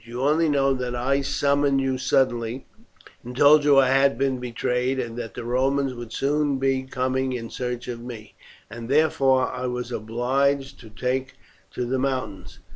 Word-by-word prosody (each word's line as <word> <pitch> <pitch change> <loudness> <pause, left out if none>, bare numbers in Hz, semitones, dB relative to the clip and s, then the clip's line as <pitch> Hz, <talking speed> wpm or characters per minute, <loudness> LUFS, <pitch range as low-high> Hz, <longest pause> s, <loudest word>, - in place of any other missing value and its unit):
You 120 +2 -7
only 155 +3 +3
know 135 -2 +2
that 125 -2 -3
I 135 +3 0
summoned 140 0 +1
you 135 -1 -1
suddenly, 125 -1 0 0.6
and 125 +1 -9
told 145 +1 +6
you 145 -1 +5
I 135 -1 +5
had 135 +1 +3
been 135 -1 0
betrayed, 125 +2 -1
and 115 -2 -4
that 115 -4 -7
the - - -6
Romans 135 +3 0
would 120 -2 -9
soon 145 +1 0
be 135 0 +1
coming 130 0 -1
in 115 -2 -6
search 125 -1 -4
of 120 -1 -5
me, 115 -3 -9 0.3
and 115 +2 -9
therefore 135 -3 +3
I 125 0 -3
was 125 0 -4
obliged 135 +5 -1
to 115 - -13
take 130 +4 -3 0.4
to 125 - -2
the 130 +2 -1
mountains. 130 -7 -3
130 Hz, 175 wpm, -24 LUFS, 125-135 Hz, 0.6 s, told